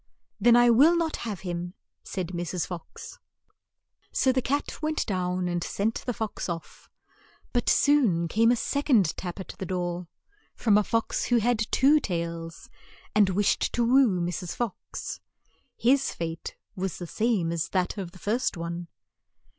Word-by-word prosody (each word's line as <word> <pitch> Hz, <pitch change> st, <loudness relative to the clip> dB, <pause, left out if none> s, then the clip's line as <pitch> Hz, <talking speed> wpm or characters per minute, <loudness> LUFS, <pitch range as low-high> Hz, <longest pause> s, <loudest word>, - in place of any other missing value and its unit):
"Then 235 Hz, +3 st, +6 dB
I 240 Hz, 0 st, +6 dB
will 290 Hz, +9 st, +6 dB
not 330 Hz, -2 st, -1 dB
have 205 Hz, -4 st, -4 dB
him," 175 Hz, 0 st, -4 dB, 0.3 s
said 185 Hz, -3 st, -4 dB
Mrs. 175 Hz, -1 st, -3 dB
Fox. 175 Hz, -3 st, -9 dB, 0.9 s
So 260 Hz, -, +3 dB
the 260 Hz, 0 st, +1 dB
cat 285 Hz, +4 st, -2 dB
went 310 Hz, 0 st, -1 dB
down 180 Hz, -2 st, -1 dB
and 175 Hz, -1 st, -1 dB
sent 215 Hz, +5 st, -2 dB
the 245 Hz, -, 0 dB
fox 220 Hz, -3 st, -4 dB
off; 165 Hz, -1 st, -7 dB, 0.6 s
but 245 Hz, -, +1 dB
soon 235 Hz, -, +3 dB
came 225 Hz, +7 st, +3 dB
a 245 Hz, -, +5 dB
sec 280 Hz, +5 st, -2 dB
ond 200 Hz, -, +4 dB
tap 180 Hz, +1 st, -6 dB
at 190 Hz, -, -7 dB
the 190 Hz, -, -3 dB
door, 175 Hz, -1 st, -3 dB, 0.5 s
from 215 Hz, -4 st, +3 dB
a 210 Hz, -, +5 dB
fox 230 Hz, +2 st, -1 dB
who 245 Hz, -, +3 dB
had 230 Hz, -1 st, +1 dB
two 290 Hz, +3 st, +5 dB
tails, 170 Hz, -, -4 dB, 0.5 s
and 205 Hz, -2 st, +4 dB
wished 200 Hz, +2 st, +1 dB
to 240 Hz, -, +1 dB
woo 245 Hz, -6 st, +4 dB
Mrs. 175 Hz, 0 st, -3 dB
Fox. 235 Hz, -5 st, -5 dB, 0.6 s
His 265 Hz, +3 st, +3 dB
fate 165 Hz, -1 st, -5 dB, 0.2 s
was 190 Hz, -2 st, -3 dB
the 175 Hz, -, -6 dB
same 205 Hz, -3 st, 0 dB
as 170 Hz, -1 st, -2 dB
that 185 Hz, -2 st, 0 dB
of 185 Hz, -3 st, -4 dB
the 185 Hz, -, -14 dB
first 225 Hz, +3 st, -1 dB
one. 170 Hz, +1 st, -5 dB
195 Hz, 160 wpm, -27 LUFS, 175-240 Hz, 0.9 s, Then